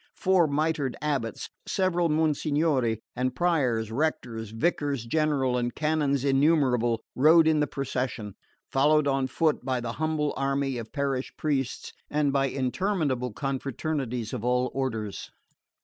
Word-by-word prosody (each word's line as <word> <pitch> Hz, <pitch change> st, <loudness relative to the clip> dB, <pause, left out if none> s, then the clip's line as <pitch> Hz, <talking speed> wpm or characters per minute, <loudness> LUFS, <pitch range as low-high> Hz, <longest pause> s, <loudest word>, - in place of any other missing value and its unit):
Four 185 Hz, -3 st, +3 dB
mitred 150 Hz, -2 st, 0 dB
Abbots, 140 Hz, -6 st, -3 dB, 0.2 s
several 175 Hz, -3 st, +1 dB
Monsignori, 150 Hz, -6 st, +1 dB
and 125 Hz, 0 st, -1 dB
Priors, 130 Hz, -11 st, +1 dB
Rectors, 115 Hz, -5 st, -2 dB
Vicars 140 Hz, +1 st, -1 dB
general 135 Hz, -2 st, +1 dB
and 120 Hz, -1 st, -2 dB
canons 150 Hz, -3 st, 0 dB
innumerable 135 Hz, -5 st, +2 dB
rode 160 Hz, +4 st, +6 dB
in 155 Hz, -1 st, +3 dB
the 150 Hz, -, +2 dB
procession, 125 Hz, -6 st, -3 dB, 0.4 s
followed 150 Hz, +2 st, +3 dB
on 135 Hz, -1 st, +1 dB
foot 155 Hz, +2 st, 0 dB
by 130 Hz, -1 st, -1 dB
the 120 Hz, -1 st, -4 dB
humble 155 Hz, -2 st, 0 dB
army 135 Hz, -1 st, -1 dB
of 115 Hz, -1 st, -8 dB
parish 140 Hz, -2 st, -2 dB
priests 135 Hz, -4 st, -2 dB, 0.2 s
and 145 Hz, -2 st, +1 dB
by 135 Hz, -1 st, +2 dB
interminable 135 Hz, -, -1 dB
confraternities 135 Hz, -2 st, -3 dB
of -, -, -4 dB
all 125 Hz, 0 st, +1 dB
orders. 110 Hz, -7 st, -3 dB
135 Hz, 130 wpm, -27 LUFS, 125-155 Hz, 0.4 s, rode